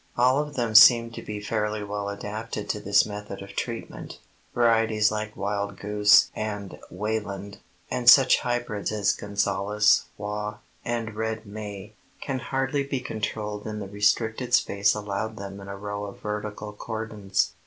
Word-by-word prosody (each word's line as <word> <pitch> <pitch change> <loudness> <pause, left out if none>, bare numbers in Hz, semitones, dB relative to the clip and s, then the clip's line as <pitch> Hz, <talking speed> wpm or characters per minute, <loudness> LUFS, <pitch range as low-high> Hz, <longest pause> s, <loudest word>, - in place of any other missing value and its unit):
All 130 +3 +4
of 150 -1 -7
them 120 -3 -1
seem 115 +1 +8
to - - -8
be 105 -1 -6
fairly 105 0 -2
well 100 0 -4
adapted 105 +1 -5
to 105 - -1
this 100 0 +3
method 105 -2 -7
of 100 - -11
treatment. 115 -2 -5 0.4
Varieties 115 -3 +3
like 110 0 -4
Wildgoose 100 +1 +3
and 105 -2 -5
Wayland, 100 0 -4 0.3
and 120 -1 +4
such 130 -1 +7
hybrids 120 -5 -2
as 100 -2 +2
Gonzales, 100 +1 +1
Waugh 105 0 -4 0.3
and 115 -2 -3
Red 110 +1 -3
May, 105 0 -8 0.3
can 135 -2 -3
hardly 135 +3 -1
be 140 -1 -2
controlled 105 -3 -4
in 105 0 -4
the 100 -2 -5
restricted 110 +4 +1
space 100 -3 +2
allowed 105 +1 -4
them 100 0 -7
in 100 - -10
a 100 0 -6
row 105 0 -5
of 100 - -9
vertical 105 0 -5
cordons. 105 -3 -2
105 Hz, 150 wpm, -26 LUFS, 100-115 Hz, 0.4 s, seem